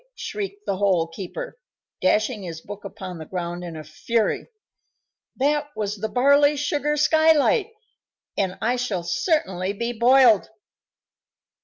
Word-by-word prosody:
shrieked 410 -2 -6
the 195 - -1
Hole 185 -4 +2
keeper, 340 - -7 0.4
dashing 215 +1 +1
his 170 -4 -6
book 205 +4 -10
upon 190 -3 -8
the 160 - -7
ground 175 -1 -4
in 170 -2 -7
a 155 - -7
fury. 215 +9 -1 0.9
"That 290 +2 +1
was 210 0 -3
the 215 +2 -3
barley 280 +5 +4
sugar 295 +1 0
skylight, 315 - +4 0.7
and 190 -2 -1
I 245 +3 +1
shall 215 -8 -2
certainly 185 - 0
be 235 +3 -3
boiled!" 240 -2 +5
220 Hz, 130 wpm, -23 LUFS, 185-290 Hz, 0.9 s, boiled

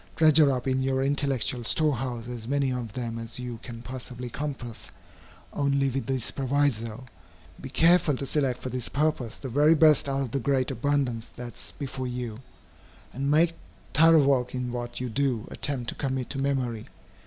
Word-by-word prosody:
Treasure 155 -2 +6
up 130 0 -2
in 130 0 +1
your 130 0 +1
intellectual 135 -3 +1
storehouse 125 -4 +1
as 120 -2 -6
many 140 0 +1
of 125 -3 -4
them 115 -2 -4
as 115 0 -6
you 125 -2 -6
can 115 -1 -9
possibly 125 0 -7
compass, 130 -5 -5 0.6
only 140 -1 +1
with 135 +1 -3
this 130 -3 -1
proviso, 130 -4 0 0.6
be 130 - -7
careful 165 -1 +4
to 140 - -4
select 135 -3 0
for 130 - -3
this 125 -1 -4
purpose 145 -6 0
the 135 - -7
very 145 +6 +4
best 155 -3 +5
out 135 0 0
of 130 -4 -3
the 140 - 0
great 130 +1 +1
abundance 130 -3 0
that 120 -1 -8
is - - -9
before 135 -2 -4
you, 120 -3 -5 0.7
and 140 +2 -2
make 165 +3 +4 0.4
thorough 160 -1 +6
work 130 -3 +2
in 125 -1 -2
what 120 0 -4
you 125 - -2
do 125 -2 -1
attempt 130 -4 -2
to - - -1
commit 130 -3 -3
to 135 - -1
memory. 130 -5 -1
130 Hz, 175 wpm, -27 LUFS, 120-140 Hz, 0.7 s, Treasure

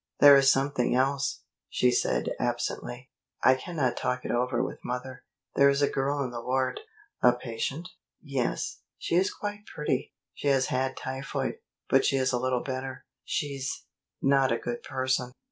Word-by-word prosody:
"There 145 -1 +10
is 135 -1 +6
something 135 -2 +1
else," 135 +2 +1 0.3
she 125 - +3
said - - +1
absently. 125 +2 -3 0.3
"I 130 - +7
cannot 130 -1 -1
talk 125 0 -2
it - - -2
over 125 0 +1
with - - -6
mother. 125 +1 -5 0.3
There 140 0 +6
is 140 +1 +2
a - - +5
girl 140 +1 0
in 125 - -4
the 120 -1 -5
ward 130 +1 0 0.2
" 410 - -39
"A 125 - +6
patient?" 125 +7 -4 0.3
"Yes. 135 -5 -2 0.2
She - - -4
is 185 +3 +3
quite 205 0 -6
pretty. 140 -3 -2 0.2
She - - -4
has 135 -2 +4
had 130 +1 -1
typhoid, 135 +1 -3 0.3
but - - +4
she - - +2
is 130 -1 +1
a 125 - +1
little 130 -1 0
better. 130 0 -5 0.2
She's 140 -2 -3 0.4
not 135 -2 +4
a 115 - +2
good 120 0 -4
person." 130 -1 -1
130 Hz, 170 wpm, -28 LUFS, 125-140 Hz, 0.4 s, There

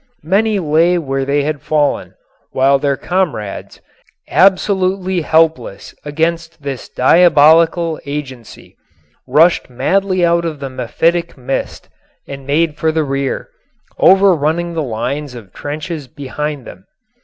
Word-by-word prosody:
Many 205 +6 +1
lay 170 +1 +2
where 135 -4 -2
they 140 +1 0
had 150 -1 -3
fallen, 150 -1 -1 0.3
while 135 +1 +2
their 140 -1 0
comrades, 165 - -3 0.5
absolutely 190 -1 +2
helpless 160 -10 0
against 165 +1 -3
this 135 -3 -6
diabolical 165 +2 +4
agency, 130 -5 -8 0.5
rushed 155 +5 +3
madly 185 +8 0
out 170 0 +2
of 160 -3 -4
the 135 -1 -6
mephitic 165 +8 -1
mist 135 +1 -4 0.4
and 135 -1 -9
made 155 +1 0
for 160 - +1
the 160 0 0
rear, 135 - -3 0.5
over 195 0 +5
running 170 +3 -1
the 165 - -2
lines 130 +2 -4
of 105 -6 -12
trenches 155 0 -6
behind 145 +1 -5
them. 95 - -13
155 Hz, 120 wpm, -16 LUFS, 140-170 Hz, 0.5 s, over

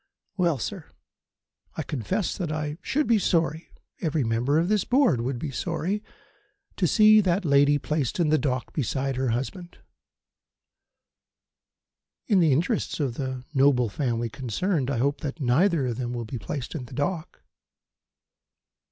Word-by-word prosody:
Well, 175 -6 +1
sir, 115 - -5 0.9
I - - -3
confess 180 - -2
that 175 -5 -3
I 150 0 -3
should 300 +2 0
be 230 -2 +3
sorry 165 -3 0 0.3
every 155 -4 0
member 120 +6 +1
of 165 +2 +2
this 210 -1 +2
Board 245 - +3
would 125 +2 -2
be 140 +3 -4
sorry 175 +8 -2 0.8
to - - +2
see 215 0 +6
that 185 0 0
lady 145 0 +4
placed 150 0 -2
in 165 -3 +2
the 155 0 +3
dock 130 -2 -2
beside 135 -1 -1
her 130 0 0
husband." 170 - -4 2.5
"In 205 -5 +3
the 165 -4 +4
interests 170 - 0
of 135 -5 0
the 130 -1 -5
noble 135 -4 +3
family 120 +1 -1
concerned, 135 - -1
I 140 - -1
hope 140 +4 0
that 150 +1 -5
neither 145 +4 +2
of 120 -2 -2
them 125 -1 -3
will 120 -1 -4
be 115 +2 -6
placed 125 +5 -5
in 145 -7 -5
the - - -11
dock." 155 +3 -3
145 Hz, 150 wpm, -26 LUFS, 130-175 Hz, 2.5 s, see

